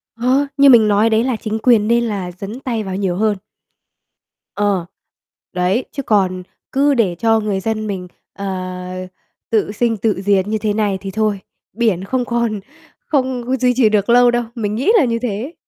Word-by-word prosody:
Ờ, 255 +5 +1
như 280 0 +7
mình 225 -4 +7
nói 210 +2 +3
đấy 220 +1 +2
là 255 -2 0
chính 220 0 -3
quyền 225 -4 +4
nên 235 +1 +3
là 195 -5 -3
dấn 200 +7 -8
tay 235 -5 -3
vào 190 -2 -5
nhiều 190 -3 -1
hơn. 210 +1 +1 1.2
Ờ, 200 -4 0 0.7
đấy, 185 +7 0
chứ 275 - -5
còn 185 -4 +1 0.3
cứ 280 +1 +3
để 200 -9 +1
cho 225 -1 +3
người 210 -3 -1
dân 215 +1 -2
mình, 185 -3 -4 0.3
ờ, 200 +1 -7 1.0
tự 215 -2 +1
sinh, 225 +1 0
tự 205 -2 -1
diệt 200 -1 +2
như 220 +1 0
thế 210 -1 -1
này 205 -2 0
thì 195 - -5
thôi, 215 -1 0 0.3
biển 215 -5 0
không 250 +5 -1
còn 235 -3 -1 0.5
không 260 - -1
duy 250 -1 +3
trì 235 -4 +4
được 210 +1 +1
lâu 245 0 +6
đâu, 240 0 0
mình 210 -3 -2
nghĩ 270 - +2
là 360 - +4
như 230 -1 -1
thế. 245 +6 -3
220 Hz, 190 wpm, -18 LUFS, 200-240 Hz, 1.2 s, như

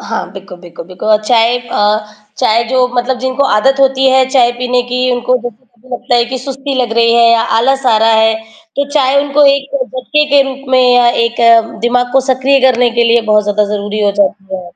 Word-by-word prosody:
हाँ, 225 - -4
बिकु 195 -2 -11
बिकु 175 -1 -12
बिकु 185 +4 -9
अ, 215 0 +4
चाय 230 +2 +1
अ, 215 -3 -1 0.4
चाय 230 +2 +1
जो 255 0 +1
मतलब 250 +1 -2
जिनको 260 +2 -2
आदत 270 +4 +1
होती 270 0 +2
है, 260 0 +3
चाय 250 -3 +3
पीने 250 0 -1
की 250 +1 -2
उनको 245 +1 0
जैसे 240 +1 -9
कभी 240 +1 -26
लगता 245 - -3
है 235 - +2
कि 260 +2 -6
सुस्ती 270 +2 -6
लग 235 -2 -4
रही 230 0 +3
है 235 0 +4
या 230 -1 +2 0.2
आलस 270 +3 0
आ 230 -3 +3
रहा 225 +1 +2
है, 220 0 +2 0.4
तो 280 0 -2
चाय 280 -2 +1
उनको 290 +1 +1
एक 280 0 -5
झटके 260 +4 -2
के 280 -1 +4
रूप 270 +1 -9
में 260 -1 +3
या 245 -1 +3 0.2
एक 235 0 -3 0.5
दिमाग 245 +1 -1
को 270 - +3
सक्रिय 265 +1 +1
करने 245 -1 0
के 235 0 0
लिए 235 0 +3
बहुत 210 0 +2
ज़्यादा 210 0 0
ज़रूरी 205 +1 -4
हो 205 - +2
जाती 195 -1 -2
है। 185 - -8
245 Hz, 220 wpm, -12 LUFS, 225-260 Hz, 0.5 s, अ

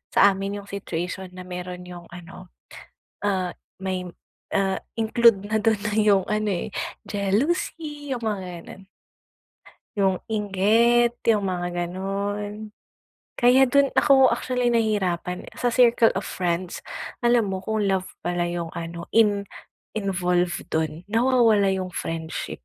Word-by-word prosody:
sa - - +3
amin 195 +1 -4
'yong 200 - -15
situation 185 -1 -4
na 185 - -8
mayro'n 180 0 -6
'yong 175 -1 -10
ano, 180 +1 -11 0.8
ah 190 -3 0 0.3
may 185 -1 -2 0.5
ah 195 -1 +1 0.2
include 230 -2 +4
na 220 - +2
do'n 215 -1 +1
na 210 0 -2
'yong, 205 -3 +4
ano, 215 0 0
eh, 175 - -3 0.4
jealousy, 290 - -1
'yong 245 - -5
mga, 215 -3 -2 0.2
gano'n. 190 - -12 1.1
'Yong 190 -2 +2
inggit, 220 +4 +3
'yong 215 -3 +4
mga 180 -2 -2 0.2
gano'n. 205 +3 -4 0.7
Kaya 255 +1 +5
do'n 280 +1 +3
ako, 265 -2 +5
actually 250 -1 0
nahirapan 190 -6 0
sa 245 - -1
circle 235 -1 +5
of 195 - -2
friends. 175 0 -2 0.4
Alam 240 -4 +3
mo 190 - -3
kung 215 +1 -1
love 190 -1 0 0.2
pala 175 0 0
'yong 170 -1 -4
ano, 170 0 -6
in 205 -3 +4 0.5
involved 180 -4 0
do'n, 160 +1 -1
nawawala 225 -2 +3
'yong 185 -1 -2
friendship. 160 - -5
200 Hz, 130 wpm, -24 LUFS, 180-225 Hz, 1.1 s, Kaya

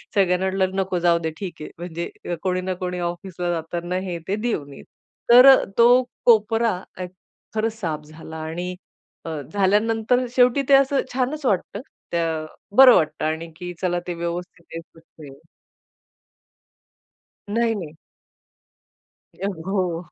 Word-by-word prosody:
सगळ्यांना 185 -2 +2
म्हटलं, 190 0 0
"नको 190 -2 -1
जाऊदे 170 -2 +2
ठीक 185 -5 -7
आहे." 150 - -7
म्हणजे 170 0 -6
कोणी 185 -1 0
ना 185 0 -2
कोणी 180 0 -3
ऑफिसला 175 0 -4
जाताना 170 +2 -3
हे, 180 -2 -3
ते 195 - 0
देऊन 210 -11 -3
येईल. - - -13 0.5
तर 250 +2 +9
अ, 270 -1 +8
तो 245 +2 +6 0.2
कोपरा 225 0 +4 0.3
अ, 185 - -4 0.5
खरंच 220 +1 -1
साफ 155 -6 -3
झाला. 160 +1 -10
आणि 170 +3 -5 0.5
अ, - - -4 0.2
झाल्यानंतर 220 +5 +2
शेवटी 250 +2 +4
ते - - +6
असं 275 0 +3
छानच 265 +4 -2
वाटतं. 200 -1 -1 0.3
त्या 165 -2 -1 0.3
बरं 260 -2 +10
वाटतं 155 -1 0
आणि 160 +2 -2
की 180 +1 -7
चला 175 -1 0
ते 175 - -2
व्यवस्थित 170 0 -5
आहे 165 - -4
तिथे. 160 -4 -15 2.2
नाही, 230 0 +2
नाही. 165 -6 -7 1.4
अ, 195 - -4 0.2
हो. 180 -3 -1
180 Hz, 135 wpm, -22 LUFS, 170-220 Hz, 2.2 s, बरं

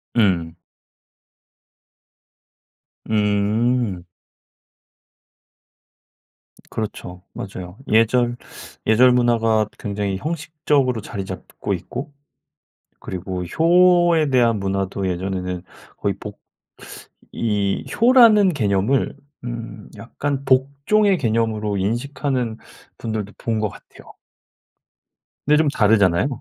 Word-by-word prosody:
음. 90 -7 +1 2.5
음. 105 0 +1 2.7
그렇죠. 90 -4 -6
맞아요. 95 -1 -8
예절 120 +2 +2 0.5
예절 125 +4 +6
문화가 115 -3 +2
굉장히 100 -1 -3
형식적으로 150 - -1
자리 100 -2 -6
잡고 95 -1 -5
있고 145 +3 -6 0.9
그리고 90 0 -5
효에 175 - +4
대한 120 -4 +3
문화도 95 0 -2
예전에는 90 0 -3 0.3
거의 - - -1
복 - - -9 0.9
이 105 -3 -1
효라는 230 -5 +6
개념을 105 +1 0 0.3
음 115 -3 -7
약간 140 +3 -4
복종의 140 +10 +2
개념으로 110 -3 0
인식하는 120 +3 -2 0.4
분들도 110 -3 -4
본 115 -2 -2
것 105 -1 0
같아요. - - -16 1.3
근데 150 +1 +4
좀 155 0 +3
다르잖아요. 105 - +3
115 Hz, 190 characters per minute, -21 LUFS, 100-140 Hz, 2.7 s, 예절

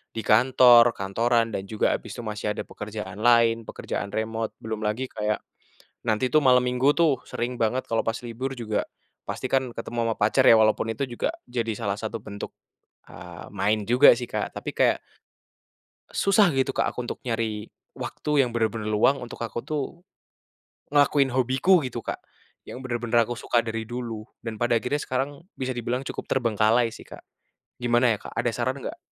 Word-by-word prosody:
di 115 - -2
kantor, 120 +1 +6
kantoran 115 +4 +1
dan 95 - -3
juga 110 0 +1
habis 110 - -8
itu - - -9
masih 105 -1 -3
ada - - -4
pekerjaan 105 -2 -7
lain 115 -1 +4
pekerjaan 100 -1 -5
remote, 110 +1 -2
belum 110 -1 -5
lagi 110 +5 -1
kayak 105 -2 -2 0.6
nanti 110 +2 +1
tuh 155 +3 +3
malem 125 -1 +4
Minggu 130 +3 +4
tuh 155 -7 +3
sering 120 +1 -4
banget 120 +2 0
kalau 115 -1 0
pas 115 +1 -2
libur 120 +2 -5
juga 110 -2 -1 0.4
pasti - - -4
kan 130 -1 0
ketemu 115 0 -6
sama - - 0
pacar 110 +6 +3
ya 115 -3 +7
walaupun 110 +1 +2
itu 130 +5 -2
juga 120 - -2 0.2
jadi 115 -2 -2
salah 100 -4 -1
satu 110 +2 -5
bentuk, 100 -1 -7 0.6
eee, 90 -1 -10
main 105 +1 0
juga 125 +3 +8
sih, 120 0 -6
Kak. - - -3
Tapi - - -5
kayak - - +3 1.1
susah 200 -1 +4
gitu, 135 0 0
Kak, - - +1
aku 125 -1 -5
untuk - - -5
nyari 115 -3 -3 0.2
waktu 150 -2 0
yang 125 - -1
bener-bener 110 -2 -1
luang 125 +6 +3
untuk 120 - -8
aku 115 +1 -5
tuh 155 +3 -4 0.9
ngelakuin 145 -1 +4
hobiku 130 +9 +3
gitu, 125 - -5
Kak, - - -4 0.5
yang 130 - -8
bener-bener 120 -2 +1
aku 120 +1 -4
suka 120 -1 +1
dari 115 -1 -4
dulu. 115 -2 -5 0.2
Dan 110 -2 -5
pada 120 0 +2
akhirnya 145 +6 -1
sekarang, 140 +2 -3 0.2
bisa 130 -1 -3
dibilang 120 +1 -2
cukup - - -6
terbengkalai 115 -1 +2
sih, 115 - -12
Kak. - - -12 0.5
Gimana 120 -2 +2
ya, - - -19
Kak? - - -10
Ada 120 +1 +1
saran 130 +3 -1
nggak? - - -6
120 Hz, 175 wpm, -25 LUFS, 110-130 Hz, 1.1 s, juga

